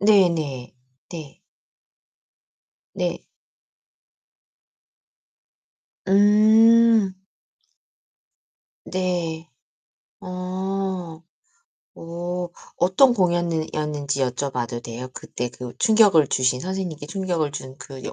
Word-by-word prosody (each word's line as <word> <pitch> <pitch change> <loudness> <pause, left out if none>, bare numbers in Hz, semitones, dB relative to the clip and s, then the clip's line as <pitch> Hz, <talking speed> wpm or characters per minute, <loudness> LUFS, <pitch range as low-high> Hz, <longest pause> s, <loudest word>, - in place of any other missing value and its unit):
네네. 170 -11 +2 0.4
네. 155 -5 -9 1.5
네. - - -3 2.9
음. 215 +1 +5 1.7
네. 175 -3 -3 0.7
어. 185 -2 -4 0.8
어. 175 +1 -5 0.3
어떤 190 +9 +4
공연는 175 -5 0
이었는지 145 -2 -2
여쭤 130 +2 -1
봐도 120 -1 -3
돼요? 120 +2 -7
그 - - -10
때 125 0 -4
그 125 0 -8
충격을 210 - +5
주신 130 -1 +1
선생님께 180 -5 -4
충격을 175 -4 -2
준 130 -2 -8
그 135 -3 -10
여 - - -5
175 Hz, 135 characters per minute, -23 LUFS, 145-190 Hz, 2.9 s, 음